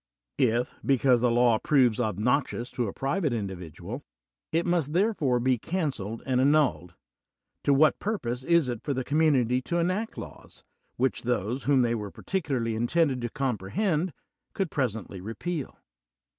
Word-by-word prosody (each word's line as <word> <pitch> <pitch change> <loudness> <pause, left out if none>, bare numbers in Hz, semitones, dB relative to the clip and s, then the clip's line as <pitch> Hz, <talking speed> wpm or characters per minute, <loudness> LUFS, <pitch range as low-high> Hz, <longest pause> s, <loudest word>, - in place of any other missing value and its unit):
If, 120 -2 +2
because 130 -2 +3
a 125 - +3
law 120 -1 +4
proves 125 -7 +3
obnoxious 120 +3 0
to 120 -3 -1
a - - -3
private 145 - -1
individual, 95 - -5 0.5
it 165 +1 +1
must 170 -5 0
therefore 170 - +2
be 125 0 +1
canceled 130 - -3
and 130 -1 +2
annulled, 135 - +2 0.7
to - - +4
what 150 +3 +4
purpose 130 - -3
is 170 -2 +3
it 120 -3 -3
for 140 - -2
the 130 - -1
community 130 -4 +2
to 170 +7 -2
enact 185 +6 -1
laws, - - -10 0.3
which 130 +1 0
those, 120 +1 -1
whom 140 -3 +4
they 120 -1 +1
were 105 -3 -3
particularly 135 - -2
intended 130 +4 +1
to 120 - -2
com 130 -3 -1
prehend, 175 - 0 0.4
could 190 -5 -2
presently 110 -8 -2
repeal? 140 - -5
130 Hz, 150 wpm, -27 LUFS, 115-155 Hz, 0.7 s, law